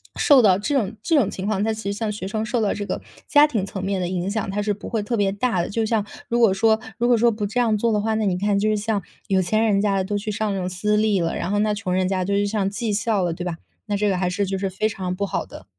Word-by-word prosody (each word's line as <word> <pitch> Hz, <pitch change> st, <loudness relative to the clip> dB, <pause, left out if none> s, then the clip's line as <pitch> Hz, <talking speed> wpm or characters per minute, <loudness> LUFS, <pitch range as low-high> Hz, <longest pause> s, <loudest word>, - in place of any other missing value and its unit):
受 285 Hz, -5 st, +6 dB
到 195 Hz, -5 st, +5 dB
这 285 Hz, +8 st, -1 dB
种 220 Hz, -5 st, 0 dB
这 330 Hz, -2 st, +3 dB
种 230 Hz, -9 st, +3 dB
情 190 Hz, +1 st, -5 dB
况 210 Hz, -2 st, 0 dB
它 220 Hz, +1 st, +1 dB
其 215 Hz, -2 st, -4 dB
实 -, -, -2 dB
像 215 Hz, -1 st, -1 dB
学 205 Hz, -2 st, -5 dB
生 215 Hz, +2 st, -2 dB
受 235 Hz, +1 st, -1 dB
到 210 Hz, -, +1 dB
这 205 Hz, -, -4 dB
个 -, -, -3 dB, 0.3 s
家 295 Hz, 0 st, +6 dB
庭 225 Hz, -10 st, -1 dB
层 195 Hz, -1 st, -6 dB
面 195 Hz, 0 st, -1 dB
的 180 Hz, -, -1 dB
影 180 Hz, 0 st, -2 dB
响， 215 Hz, -1 st, -2 dB
它 205 Hz, +1 st, -1 dB
是 205 Hz, 0 st, 0 dB
不 205 Hz, -, -9 dB
会 225 Hz, -3 st, -1 dB
特 235 Hz, +3 st, -2 dB
别 200 Hz, -2 st, +2 dB
大 200 Hz, -2 st, 0 dB
的， -, -, -3 dB
就 225 Hz, +2 st, -1 dB
像 215 Hz, -2 st, 0 dB, 0.2 s
如 235 Hz, 0 st, +1 dB
果 225 Hz, -5 st, +5 dB
说 220 Hz, +2 st, +3 dB, 0.2 s
如 240 Hz, +1 st, +1 dB
果 245 Hz, -1 st, +4 dB
说 235 Hz, +1 st, +4 dB
不 210 Hz, -1 st, -3 dB
这 215 Hz, +5 st, -2 dB
样 230 Hz, -3 st, +3 dB
做 230 Hz, +2 st, +1 dB
的 210 Hz, -, +2 dB
话， 220 Hz, +1 st, 0 dB
那 220 Hz, -1 st, 0 dB
你 185 Hz, -3 st, +1 dB
看， 200 Hz, +1 st, +1 dB
就 215 Hz, +2 st, +1 dB
是 215 Hz, -, +1 dB
像 210 Hz, 0 st, -1 dB, 0.3 s
有 190 Hz, -1 st, +2 dB
钱 215 Hz, +5 st, +1 dB
人 200 Hz, -3 st, +2 dB
家 200 Hz, -1 st, +1 dB
的 190 Hz, -, +1 dB
都 205 Hz, +1 st, -1 dB
去 215 Hz, +1 st, -3 dB
上 210 Hz, 0 st, -1 dB
那 195 Hz, -, -2 dB
种 180 Hz, 0 st, -2 dB
私 210 Hz, +4 st, 0 dB
立 210 Hz, -2 st, +2 dB
了， 165 Hz, 0 st, -1 dB
然 175 Hz, -, -3 dB
后 205 Hz, -, +1 dB
那 210 Hz, 0 st, +2 dB
穷 200 Hz, -3 st, -4 dB
人 185 Hz, 0 st, +1 dB
家 185 Hz, -1 st, 0 dB
就 200 Hz, -, -1 dB
是 205 Hz, 0 st, +2 dB
上 200 Hz, -2 st, 0 dB
技 215 Hz, +1 st, -2 dB
校 210 Hz, -2 st, +1 dB
了， 175 Hz, -2 st, 0 dB
对 170 Hz, -, -6 dB
吧？ 170 Hz, -2 st, -3 dB, 0.3 s
那 205 Hz, -, 0 dB
这 210 Hz, +1 st, +1 dB
个 190 Hz, -, +1 dB
还 180 Hz, 0 st, 0 dB
是 200 Hz, +3 st, -1 dB
就 195 Hz, 0 st, -2 dB
是 195 Hz, 0 st, -2 dB
非 190 Hz, +3 st, -1 dB
常 185 Hz, -3 st, -4 dB
不 200 Hz, +2 st, -1 dB
好 -, -, -2 dB
的。 95 Hz, -, -12 dB
205 Hz, 350 characters per minute, -22 LUFS, 195-220 Hz, 0.3 s, 受